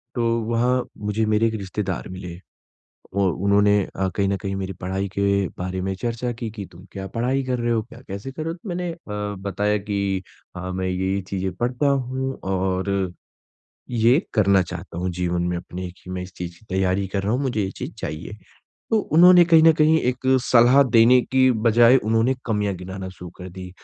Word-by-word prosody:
तो 115 -1 +1 0.2
वहाँ 120 +2 +1
मुझे 105 +1 -1
मेरे 110 +1 +2
एक 110 - -2
रिश्तेदार 95 -2 -4
मिले। 90 -2 -8 0.8
और 95 -2 +2
उन्होंने 100 +2 +3 0.2
अ, 95 0 0
कहीं 100 -1 +1
न 100 - +1
कहीं 95 +1 -4
मेरी 95 0 -4
पढ़ाई 95 +2 -2
के 100 -1 +2
बारे 90 +1 -3
में 95 +1 -2
चर्चा 120 +4 -3
की 115 -1 -5
कि 105 -3 -7
तुम 85 +3 -14
क्या 95 -1 -6
पढ़ाई 130 +4 +1
कर 125 -1 -1
रहे 120 0 0
हो, 115 -1 +1
क्या 115 +1 -14
कैसे 100 +7 -6
कर 155 - -6
रहे 160 - -2
हो? - - -7
तो 180 +4 -11
मैंने 175 0 -2
अ, - - -11 0.5
बताया 105 +1 0
कि 100 -2 -2 0.3
हाँ, 90 +1 -5
मैं 95 0 -2
ये-ये 95 +2 -1
चीज़ें 95 0 -3
पढ़ता 125 +4 0
हूँ 130 -1 -1
और, 95 0 -1 0.8
ये 120 +4 +4 0.2
करना 100 -3 +4
चाहता 85 - -7
हूँ 90 +1 -1
जीवन 90 0 -1
में 90 0 -1
अपने 90 +1 -6
कि 90 +1 -14
मैं 90 0 -4
इस 90 0 -9
चीज़ 85 -1 -7
की - - -23
तैयारी 95 +1 +1
कर 95 0 -2
रहा 100 +2 0
हूँ, 125 - 0
मुझे 125 -5 -1
ये 95 - -2
चीज़ - - -6
चाहिए। 85 +7 -6 0.6
तो 225 - +4 0.2
उन्होंने 175 +1 +8
कहीं 165 -1 +6
न 165 - +8
कहीं 155 +1 +4
एक 125 +1 -2 0.2
सलाह 125 +3 +6
देने 120 0 +5
की 130 0 +3 0.2
बज़ाए 120 +3 +6
उन्होंने 115 +2 +2
कमियाँ 105 -3 0
गिनाना 95 +1 -7
शुरू 90 -1 -10
कर 90 0 -8
दी 90 0 -9
100 Hz, 200 wpm, -23 LUFS, 95-120 Hz, 0.8 s, उन्होंने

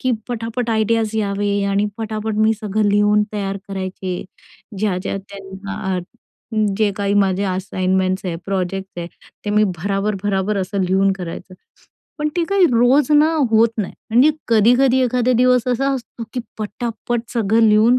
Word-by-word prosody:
की 255 - 0 0.2
पटापट 230 0 -3
आयडियाज 220 0 +1
यावे 200 -1 0
आणि 200 +1 +1
पटापट 220 -1 -3
मी 220 +1 +4
सगळं 210 0 0
लिहून 205 +1 +3
तयार 195 -2 -2
करायचे. 185 -1 -4 0.5
ज्या-ज्या 190 -2 -1
त्यांना 195 0 -5 0.8
जे 215 -2 +3
काही 200 0 0
माझे 195 -1 +2
असाइनमेंट्स 185 0 -1
आहे, 170 -2 -2
प्रोजेक्ट 190 -1 -3
आहे, 170 - -4 0.4
ते 205 - -2
मी 210 +1 +4
भराभर-भराभर 195 +2 -1
असं 195 +1 -1
लिहून 190 +2 +2
करायचे. 185 0 -7 0.6
पण 300 0 0
ते 345 - +2
काही 395 +1 +3
रोज 250 +5 +4
ना 305 +2 +5 0.2
होत 225 +1 +5
नाही 205 - -2 0.2
आणि 250 +7 +5 0.2
कधी-कधी 245 +4 +4
एखादा 250 0 +2
दिवस 250 0 +3
असा 270 +3 +1
असतो 245 -2 -7
की 250 - -2 0.2
पटापट 230 +2 -3
सगळं 225 -1 +2
लिहून 220 +4 +5
210 Hz, 145 wpm, -19 LUFS, 195-230 Hz, 0.8 s, ना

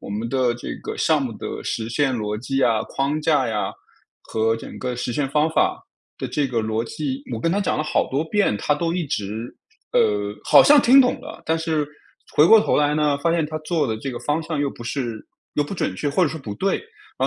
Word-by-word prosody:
我 - - -9
们 110 +3 -3
的 130 -1 +1
这 120 - -6
个 - - -5
项 - - +2
目 - - -3
的 - - -6
实 110 0 -3
现 135 +3 +1
逻 105 -3 -2
辑 135 +4 -2
啊， 115 -4 +3
框 140 +3 -1
架 150 -5 +3
呀， 110 -2 -2 0.5
和 115 +1 0
整 115 - -9
个 125 -1 -3
实 120 0 -3
现 140 +1 -1
方 150 +2 +2
法 365 - +1 0.4
的 - - -3
这 145 -2 -1
个 120 -3 0
逻 110 +1 -1
辑， 140 +2 -4
我 115 - -3
跟 165 - +1
他 200 - +1
讲 195 - 0
了 155 - -1
好 - - 0
多 140 +4 0
遍， 200 - +1
他 145 +8 +1
都 165 +2 -1
一 175 -2 -2
直， 110 -1 -4 0.4
呃， 105 0 +2
好 - - +7
像 290 0 +7
听 270 +3 +7
懂 250 0 +2
了， 295 +5 -10
但 160 - +2
是 160 -2 -1 0.5
回 150 - +6
过 225 - +8
头 - - +1
来 150 0 +2
呢， 150 -2 +2
发 165 +4 +1
现 165 -3 +1
他 155 +1 -5
做 155 -2 0
的 110 - -2
这 135 +5 -5
个 120 - -5
方 150 +2 -1
向 160 -2 -4
又 145 - +1
不 120 - -11
是 120 -3 -4 0.3
又 145 - +1
不 145 - -7
准 100 - -2
确， 145 - -2
或 140 - 0
者 165 - +4
说 160 - -6
不 110 -6 -6
对， 195 - 0 0.4
然 - - +1
140 Hz, 260 characters per minute, -22 LUFS, 115-160 Hz, 0.5 s, 过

